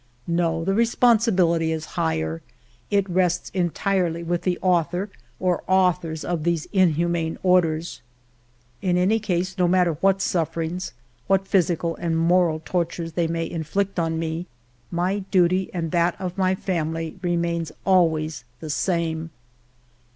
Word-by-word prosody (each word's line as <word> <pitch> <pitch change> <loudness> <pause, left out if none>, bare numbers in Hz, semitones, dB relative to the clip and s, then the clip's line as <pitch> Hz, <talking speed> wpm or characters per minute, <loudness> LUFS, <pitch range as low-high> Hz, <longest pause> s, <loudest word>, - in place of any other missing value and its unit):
No, 165 -1 0
the 195 - +1
responsibility 215 -8 +3
is 160 0 -3
higher; 80 0 -1 0.5
it 200 -1 +2
rests 180 -1 0
en 180 -2 +1
tirely 175 -2 -1
with 170 +1 -1
the 180 -2 0
author 180 +2 0 0.3
or 180 -2 +1
authors 175 -4 +1
of 170 -3 -2
these 170 -2 0
inhu 175 -4 +3
man 165 -1 -1
orders. 170 -3 +2 0.8
In 180 -2 +1
any 195 +5 +3
case, 190 -2 -2
no 180 - +4
matter 180 -1 +3
what 195 0 +3
sufferings, 170 0 -2 0.3
what 195 0 +2
physical 170 -3 +1
and 165 -1 -1
moral 165 -1 +2
tortures 170 -1 -2
they 170 0 +1
may 165 0 -2
inflict 185 +4 -2
on 165 -1 0
me, 165 +2 -3 0.4
my 180 +4 0
duty 185 0 +2
and 165 -3 -3
that 175 +1 +1
of 180 -1 -4
my 190 -1 +2
family 165 -2 -3
remains 170 -2 -1
al 185 -3 +5
ways 155 -3 -4 0.2
the 155 -2 -5
same. 165 -1 -1
175 Hz, 145 wpm, -23 LUFS, 165-185 Hz, 0.8 s, al